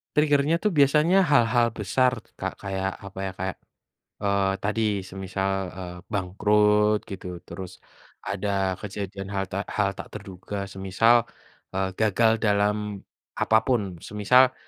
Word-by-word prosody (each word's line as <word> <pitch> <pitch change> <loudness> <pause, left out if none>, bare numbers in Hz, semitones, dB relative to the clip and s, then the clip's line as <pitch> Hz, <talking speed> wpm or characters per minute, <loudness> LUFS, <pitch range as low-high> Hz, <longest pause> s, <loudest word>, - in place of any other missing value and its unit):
Trigger-nya 150 +1 +3
tuh 210 - +3
biasanya 155 +5 +4
hal-hal 120 -4 +3
besar, 120 +3 +1 0.2
Kak, - - -3
kayak 95 0 -2
apa 95 -1 -9
ya, - - -4
kayak, 95 0 -4 0.6
eee, 100 -1 +2
tadi 105 +2 -1 0.2
semisal, 95 +1 -3 0.2
eee, 90 -1 -7 0.2
bangkrut 105 +2 +3
gitu, 90 -2 -7
terus, 95 -1 -9 0.4
ada 95 -1 -1
kejadian 100 -1 -6
hal 95 -1 -2
tak 100 +1 -3
hal 100 -2 -1
tak - - -9
terduga, 100 0 -6
semisal, 100 +5 +3 0.5
eee, 95 0 0
gagal 110 +1 +3
dalam 105 -1 0 0.3
apa 110 - +3
pun, 105 -9 0
semisal, 125 +8 +3
100 Hz, 125 wpm, -25 LUFS, 95-115 Hz, 0.6 s, biasanya